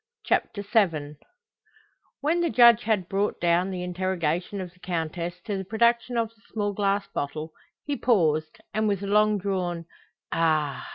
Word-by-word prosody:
CHAPTER 200 Hz, -2 st, 0 dB
VII 165 Hz, -9 st, +1 dB, 1.0 s
When 320 Hz, +4 st, +1 dB
the 340 Hz, -, +1 dB
Judge 235 Hz, -4 st, +7 dB
had 210 Hz, -5 st, +1 dB
brought 200 Hz, +2 st, -1 dB
down 175 Hz, +2 st, +2 dB
the 180 Hz, -2 st, -4 dB
interrogation 180 Hz, 0 st, -2 dB
of 180 Hz, -2 st, -6 dB
the 180 Hz, -, -25 dB
Countess 175 Hz, 0 st, -3 dB
to 200 Hz, -1 st, -3 dB
the -, -, -4 dB
production 235 Hz, +4 st, +1 dB
of 230 Hz, -1 st, +1 dB
the 225 Hz, 0 st, -29 dB
small 205 Hz, -2 st, -1 dB
glass 200 Hz, 0 st, 0 dB
bottle, 155 Hz, +3 st, -4 dB, 0.3 s
he 290 Hz, -, -1 dB
paused, 160 Hz, -, +1 dB, 0.2 s
and 215 Hz, +1 st, +1 dB
with 200 Hz, -1 st, 0 dB
a -, -, -2 dB
long 210 Hz, +1 st, +3 dB
drawn 180 Hz, -4 st, -2 dB, 0.5 s
"Ah!" 155 Hz, -4 st, 0 dB
190 Hz, 160 wpm, -26 LUFS, 170-215 Hz, 1.0 s, Judge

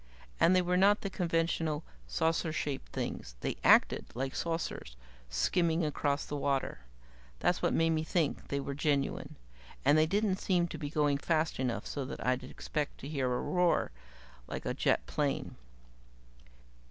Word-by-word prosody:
And 185 Hz, -, +5 dB
they 185 Hz, -, +4 dB
were 180 Hz, +1 st, +1 dB
not 200 Hz, +3 st, +5 dB
the 200 Hz, -, -4 dB
conventional 165 Hz, -3 st, 0 dB, 0.2 s
saucer 160 Hz, -, 0 dB
shaped 145 Hz, -3 st, -3 dB
things -, -, -4 dB
they -, -, -2 dB
acted -, -, +5 dB
like 135 Hz, +2 st, -2 dB
saucers 165 Hz, -, -3 dB, 0.3 s
skimming 165 Hz, -, +1 dB
across 145 Hz, -1 st, 0 dB
the 145 Hz, -, -4 dB
water. 140 Hz, -, -1 dB, 0.6 s
That's -, -, +1 dB
what -, -, +2 dB
made 165 Hz, 0 st, +3 dB
me 160 Hz, -1 st, +1 dB
think 160 Hz, -1 st, -1 dB
they 140 Hz, -, -1 dB
were 140 Hz, 0 st, -4 dB
genuine. 140 Hz, -1 st, -1 dB, 0.5 s
And 155 Hz, -, +6 dB
they 155 Hz, -, +4 dB
didn't 200 Hz, +1 st, +1 dB
seem 180 Hz, -3 st, +1 dB
to 160 Hz, -, -6 dB
be 145 Hz, -2 st, -4 dB
going 145 Hz, -2 st, +1 dB
fast 160 Hz, -1 st, 0 dB
enough 125 Hz, -3 st, -1 dB
so 140 Hz, -, -3 dB
that -, -, -6 dB
I'd 130 Hz, +1 st, +1 dB
expect 150 Hz, -2 st, -4 dB
to 135 Hz, -, -6 dB
hear 135 Hz, -4 st, -1 dB
a 125 Hz, -, 0 dB
roar 180 Hz, -, +2 dB, 0.6 s
like -, -, -5 dB
a -, -, 0 dB
jet -, -, +1 dB
plane. -, -, -1 dB
155 Hz, 165 wpm, -32 LUFS, 140-170 Hz, 0.6 s, And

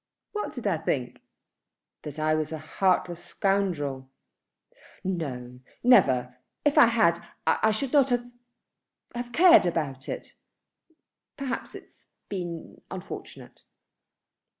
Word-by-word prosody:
"What 420 Hz, -, -3 dB
did 245 Hz, -, -7 dB
I 185 Hz, -6 st, +1 dB
think?" 130 Hz, -6 st, -2 dB, 0.8 s
"That 150 Hz, -1 st, -8 dB
I 155 Hz, 0 st, +1 dB
was 155 Hz, 0 st, -1 dB
a 160 Hz, -, -3 dB
heartless 175 Hz, +2 st, 0 dB
scoundrel." 155 Hz, -10 st, -1 dB, 0.9 s
"No, 130 Hz, -9 st, -4 dB, 0.2 s
never. 130 Hz, -, +4 dB, 0.3 s
If 295 Hz, -, +3 dB
I -, -, +9 dB
had, 170 Hz, -8 st, +3 dB, 0.2 s
I 220 Hz, -, +3 dB
should 240 Hz, +6 st, -1 dB
not 275 Hz, -2 st, +5 dB
have, 245 Hz, -1 st, +1 dB, 0.9 s
have 240 Hz, 0 st, -5 dB
cared 340 Hz, -, +7 dB
about 140 Hz, -5 st, -3 dB
it. -, -, -6 dB, 1.0 s
Perhaps 275 Hz, -2 st, -4 dB
it -, -, -9 dB
has -, -, -29 dB, 0.2 s
been 175 Hz, -4 st, -6 dB
unfortunate." -, -, -9 dB
175 Hz, 115 wpm, -27 LUFS, 150-240 Hz, 1.0 s, I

